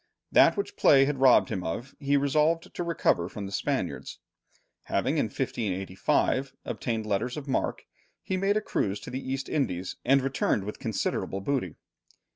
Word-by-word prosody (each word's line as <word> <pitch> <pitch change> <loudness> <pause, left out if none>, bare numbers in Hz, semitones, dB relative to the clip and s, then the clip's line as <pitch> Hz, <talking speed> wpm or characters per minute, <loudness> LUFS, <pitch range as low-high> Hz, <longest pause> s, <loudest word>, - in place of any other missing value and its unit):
That - - +6
which 405 +1 -3
play 135 -1 +6
had 140 -1 -2
robbed 130 -2 +6
him 95 -5 -3
of, 115 +12 -4
he 140 0 +2
resolved 150 +4 +1
to - - -3
recover 165 - +1
from 100 -1 -6
the 95 - -7
Spaniards. - - -2 0.7
Having - - 0
in - - +2
1585 100 +6 -1
obtained 115 -3 -3
letters 110 +5 -1
of 145 -1 -6
mark, 135 - -1 0.4
he 190 - -2
made 195 +2 +2
a - - +1
cruise 100 - -1
to - - -8
the 130 +2 -4
East 135 0 -3
Indies 95 - -2
and 135 +1 +4
returned 135 -6 0
with 105 +2 -6
considerable 95 - -2
booty. 125 - -2
130 Hz, 165 wpm, -28 LUFS, 100-140 Hz, 0.7 s, That